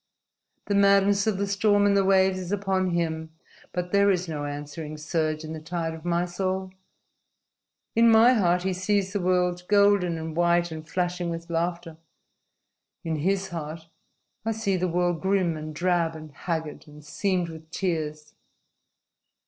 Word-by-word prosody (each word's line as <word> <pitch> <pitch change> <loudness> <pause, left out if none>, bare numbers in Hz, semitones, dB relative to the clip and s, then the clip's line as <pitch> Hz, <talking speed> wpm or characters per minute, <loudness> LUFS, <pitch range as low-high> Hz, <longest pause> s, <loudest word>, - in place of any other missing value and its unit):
The 205 - -1
madness 200 0 +4
of 210 -3 +1
the 200 - 0
storm 205 +1 +2
and 200 0 +3
the 195 - +4
waves 190 -1 +3
is 185 0 -6
upon 190 -2 0
him, 160 -2 -2 0.4
but 180 0 -3
there 200 0 +4
is 180 -2 +1
no 150 -3 -4
answering 145 +2 -6
surge 155 0 -1
in 155 0 -6
the 160 - -6
tide 165 +1 -3
of 160 -1 -10
my 175 0 +1
soul. 185 +1 -3 1.2
In 230 +1 +6
my 225 +3 +7
heart 180 -5 +2
he 190 0 0
sees 195 +1 0
the 205 - 0
world 180 -1 +1
golden 200 -4 +3
and 160 -1 -6
white 175 0 +2
and 155 0 -8
flashing 180 -1 -1
with 170 0 -6
laughter. 170 -1 -2 1.1
In 160 -1 -2
his 190 +5 0
heart 160 -1 -7 0.5
I 225 +1 -1
see 215 -3 -1
the 185 0 0
world 175 -1 0
grim 190 -3 +1
and 155 0 -6
drab 170 0 0
and 155 -1 -10
haggard 160 0 -4
and 150 0 -14
seamed 180 +2 -1
with 160 -1 -11
tears. 155 -5 -3
175 Hz, 165 wpm, -26 LUFS, 160-195 Hz, 1.2 s, my